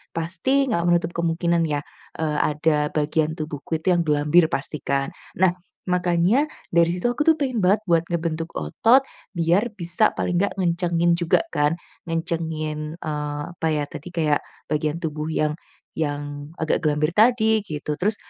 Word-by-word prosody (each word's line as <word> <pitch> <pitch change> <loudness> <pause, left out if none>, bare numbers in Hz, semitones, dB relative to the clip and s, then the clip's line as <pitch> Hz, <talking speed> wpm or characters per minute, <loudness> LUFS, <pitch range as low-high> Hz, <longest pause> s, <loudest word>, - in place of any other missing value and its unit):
pasti 185 +12 +1
nggak 170 -5 +1
menutup 170 -1 +2
kemungkinan 170 0 +1
ya, 145 -1 0 0.4
eee, 155 -2 0
ada 150 0 +1
bagian 155 +1 +1
tubuhku 155 +1 -4
itu 185 +4 +1
yang 175 - +2
gelambir 150 +3 +4
pasti, 140 +2 -3
kan. 140 0 0 0.3
Nah, 185 -1 +5 0.4
makanya 180 - +2 0.3
dari 170 0 +4
situ 180 +7 0
aku 245 - -3
tuh, 325 - +7
pengen 260 -4 -1
banget 200 +4 +4
buat 165 -1 +5
ngebentuk 165 -1 -2
otot. 225 - +4 0.4
Biar 175 +8 +2
bisa, 175 +4 +2
paling 175 - 0
nggak 200 - 0
ngencengin 170 -1 +2
juga 170 - +2
kan, 150 +1 +3 0.4
ngencengin, 160 -2 -3
eee, 150 -1 -3
apa 165 -1 -2
ya, 150 -1 0
tadi 155 +2 -8
kayak 155 -3 +2 0.3
bagian 150 +1 0
tubuh 155 -1 -3
yang 155 -1 +1 0.4
yang 145 -1 -3
agak 160 - +1
gelambir 150 +1 +1
tadi 220 +2 +4
gitu. 150 -2 -3
Terus, 210 +4 +2
165 Hz, 155 wpm, -23 LUFS, 150-175 Hz, 0.4 s, tuh